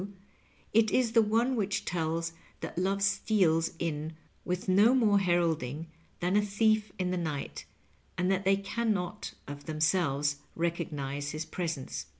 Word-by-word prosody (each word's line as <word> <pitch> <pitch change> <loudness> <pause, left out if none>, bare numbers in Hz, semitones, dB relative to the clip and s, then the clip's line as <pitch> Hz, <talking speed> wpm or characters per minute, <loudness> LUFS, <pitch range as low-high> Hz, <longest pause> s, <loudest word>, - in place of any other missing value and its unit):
trae, 200 +1 -7 0.6
it 220 0 +5
is 240 +1 +2
the 230 0 +6
one 230 +4 +2
which 205 -1 -1
tdk 165 -1 -1 0.3
that - - -5
love 195 +2 0
steals 185 -5 +2
in 160 -1 -3 0.3
with 180 +1 -3
no 205 +7 +5
more 210 -5 +4
heralding 165 -6 0 0.4
than 180 +2 +1
a 210 - +5
thief 215 0 +2
in 180 -1 -1
the 185 - 0
night, 155 -5 -4 0.5
and 180 +1 +1
that 190 0 +1
they 195 0 +4
can 220 +2 0
not 180 +3 -4
of 145 0 -8
themselves 155 -3 +1 0.2
recognize 145 -4 -2
his 155 +1 -3
presence. 165 -7 -4
180 Hz, 150 wpm, -30 LUFS, 160-205 Hz, 0.6 s, the